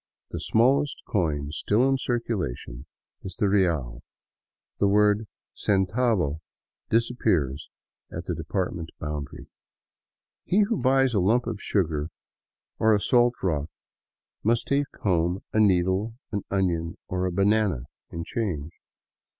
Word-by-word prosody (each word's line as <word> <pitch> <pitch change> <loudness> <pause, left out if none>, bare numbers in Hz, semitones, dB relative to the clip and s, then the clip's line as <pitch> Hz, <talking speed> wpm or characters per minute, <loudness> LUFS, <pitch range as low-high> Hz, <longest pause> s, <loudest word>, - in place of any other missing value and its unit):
The - - -4
smallest 135 +5 +2
coin 75 -7 -1
still 105 - +2
in 135 0 +2
circulation 90 - -3 0.3
is 95 - -8
the 105 - +1
real 80 -12 +1 0.4
— - - -63
the 100 - +4
word 105 +1 +3 0.3
centavo 95 - +1 0.5
disappears 90 - +1 0.4
at - - -5
the - - -2
department 85 -1 -3
boundary. 75 -2 -5 1.0
He 200 +4 +3
who 210 0 +1
buys 135 -1 +3
a 105 - +3
lump 115 +7 +2
of 100 - -4
sugar 80 -6 0 0.7
or 110 -1 +5
a - - +1
salt 120 +3 +3
rock 80 -5 0 0.7
must 115 +2 +2
take 140 0 +2 0.2
home 90 -1 +1
a 110 - +2
needle, 95 +2 +2 0.2
an 100 -2 -1
onion, 85 -4 0
or 90 0 -1
a - - -2
banana 100 - +2 0.3
in 85 0 -5
change. 85 -8 -3
100 Hz, 125 wpm, -26 LUFS, 80-115 Hz, 1.0 s, or